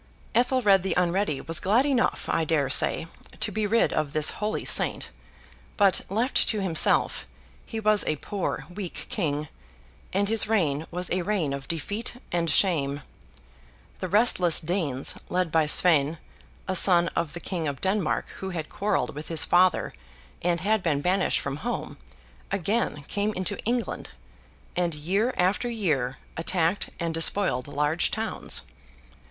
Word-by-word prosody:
Ethelred 240 -5 +3
the 190 - -2
Unready 180 -4 0
was 165 0 -1
glad 220 +8 +2
enough, 270 -4 0
I 165 - 0
dare 150 -4 0
say, 150 - +5 0.3
to 215 - 0
be 215 +1 -1
rid 230 +3 +2
of 150 -2 -2
this 155 -1 +3
holy 210 +1 -2
saint; - - 0 0.7
but, 200 -3 +4
left 230 +7 +1
to 215 - 0
himself, 180 -5 +2 0.4
he 225 - -5
was 215 -1 +3
a 155 - +1
poor 195 +6 -4
weak 190 -2 -6
king, 150 -6 -2 0.6
and 200 +2 0
his 225 0 +2
reign 160 -8 0
was 180 +1 -4
a 185 - 0
reign 175 -7 -1
of 140 0 -6
defeat 205 - -3 0.2
and 170 -1 0
shame. 145 -4 +1 1.0
The 185 - -3
restless 185 -4 +4
Danes, 155 -6 0 0.2
led 180 -2 -1
by 160 -2 +2
Sweyn, 155 -1 +4 0.5
a 190 - -1
son 175 -2 +6
of 165 -4 -3
the 175 - -6
King 170 -2 -4
of 140 -2 -4
Denmark 190 -3 0
who 190 - -5
had 165 -4 -5
quarrelled 210 +1 -1
with 150 +2 -8
his 165 -2 +1
father 180 +1 +3 0.5
and 170 -1 0
had 215 +2 +1
been 155 -5 0
banished 185 +4 +1
from 140 0 -4
home, 235 +9 -5 0.5
again 195 -4 -1
came 205 +1 -1
into 185 +2 +1
England, 240 +1 -2 0.7
and, 175 -3 0
year 195 +11 0
after 190 +7 +1
year, 150 - -1 0.2
attacked 170 +2 0
and 170 -1 -2
despoiled 165 -5 +2
large 150 +3 0
towns. 220 0 -2
180 Hz, 150 wpm, -26 LUFS, 155-205 Hz, 1.0 s, son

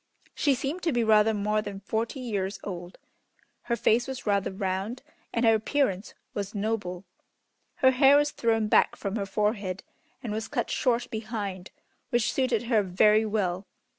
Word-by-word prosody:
She 280 -3 +2
seemed 280 +8 -3
to 335 - 0
be 240 -3 +1
rather 220 0 +5
more 210 0 0
than 200 -2 -6
forty 225 +6 -3
years 200 -5 -3
old. 180 -2 -7 0.7
Her 235 - 0
face 235 +2 +2
was 265 -1 -6
rather 200 -2 +1
round, 195 +5 -3 0.3
and 230 0 0
her 225 - +6
appearance 220 -3 0 0.2
was 200 +1 -4
noble. 200 -3 -2 0.7
Her 260 - +4
hair 270 +2 +6
was 290 0 +2
thrown 225 -2 +1
back - - +4
from 200 0 -4
her 200 -3 -2
forehead 200 -2 -1 0.4
and 220 -4 -3
was 220 +1 -3
cut 240 -5 -2
short 245 -3 0
behind, 210 -4 -5 0.4
which 240 -1 +1
suited 255 -4 +1
her 230 -3 +2
very 210 +3 +3
well. 195 -3 -1
215 Hz, 165 wpm, -27 LUFS, 200-240 Hz, 0.7 s, her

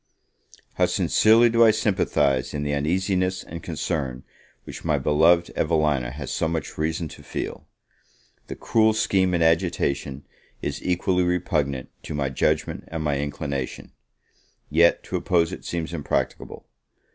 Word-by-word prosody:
HOW - - +3
sincerely 115 +2 +4
do 115 0 +4
I 115 - +7
sympathise 75 - +1
in 75 - -2
the 75 0 -1
uneasiness 90 +5 0
and 85 +1 -8
concern 75 -6 -3 0.4
which - - -9
my - - +1
beloved 85 +3 +3
Evelina 75 -6 +1
has 70 +3 -7
so 80 - 0
much 80 -3 -3
reason 80 +1 -2
to - - -12
feel! - - -6 0.8
The - - -6
cruel 110 -1 +2
scheme 95 -4 +1
in 85 - +2
agitation 70 -4 0 0.3
is 70 0 -4
equally 90 +1 +1
repugnant 80 -7 -1
to 75 - -6
my 70 -2 -1
judgment 65 - -1
and 80 -1 -4
my 70 -2 0
inclination; 70 -2 -4 0.8
yet 85 +3 +4
to - - -3
oppose 85 0 +1
it - - -9
seems 85 -1 -4
impracticable. 75 -4 -3
80 Hz, 140 wpm, -24 LUFS, 70-90 Hz, 0.8 s, I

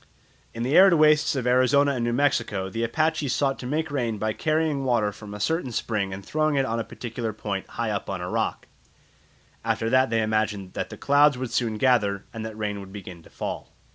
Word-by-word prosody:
In 115 - -5
the 130 +5 0
arid 190 -1 +8
wastes 155 0 +4
of 130 -3 -2
Arizona 130 +3 +4
and 125 -4 -2
New 120 - 0
Mexico 120 -8 0
the 115 +3 -2
Apaches 155 +3 0
sought 135 -1 0
to 125 - -6
make 155 +3 -2
rain 120 -6 -1
by 110 +1 -1
carrying 155 -1 0
water 120 -5 +1
from 105 0 -11
a 105 - -7
certain 160 - -1
spring 105 -4 -2
and 95 0 -7
throwing 155 -1 0
it 135 -1 +2
on 115 0 -2
a - - -1
particular 115 -1 -5
point 100 -2 -4
high 115 -2 -2
up 100 - -3
on 95 -2 -3
a 90 - -4
rock; - - -2 1.0
after 115 0 -1
that 130 0 +4
they 115 -1 +1
imagined 110 -3 -1
that - - -3
the - - -9
clouds 145 -1 +4
would 125 -2 -4
soon 115 -2 0
gather, 105 -6 +2
and 115 -1 -5
that 110 -1 -7
rain 105 -1 -3
would 95 -1 -10
begin 95 -4 -9
to - - -18
fall. - - -6
115 Hz, 220 wpm, -25 LUFS, 105-140 Hz, 1.0 s, arid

